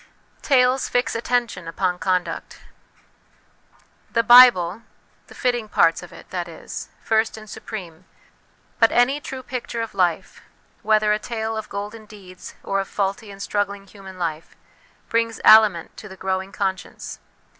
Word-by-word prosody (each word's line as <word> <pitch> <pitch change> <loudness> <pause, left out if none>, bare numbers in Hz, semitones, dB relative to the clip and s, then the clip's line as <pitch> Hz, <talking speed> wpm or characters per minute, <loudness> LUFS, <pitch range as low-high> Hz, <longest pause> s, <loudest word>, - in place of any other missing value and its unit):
Tales 255 -1 +2
fix 245 0 0
attention 230 -6 -1
upon 180 +2 -1
Conduct. 185 -1 -2 1.5
The 230 -1 +1
Bible 230 -6 +7 0.5
(the - - -15
fitting 240 -4 -1
parts 165 -4 +3
of 175 - -12
it, - - -14
that 175 -2 -3
is) 165 - -8
first 220 0 +1
and 215 0 -11
supreme; 185 -5 -9 0.7
but 225 - +5
any 265 +4 +2
true 265 -2 -7
picture 245 -2 -4
of 225 - -7
life, 185 -1 -1 0.4
whether 215 -1 +3
a 210 - -1
tale 225 -1 -4
of 220 -1 -6
golden 210 +2 -7
deeds 185 -4 -12
or 195 - -1
of 195 - -3
faulty 200 +2 -3
and 200 0 -8
struggling 200 -1 -2
human 195 -1 -13
life, 165 -2 -4 0.5
brings 230 -1 0
aliment 215 -6 +6
to 215 - -10
the 190 - -11
growing 190 +1 -3
conscience. 190 -2 -4
210 Hz, 145 wpm, -22 LUFS, 185-230 Hz, 1.5 s, Bible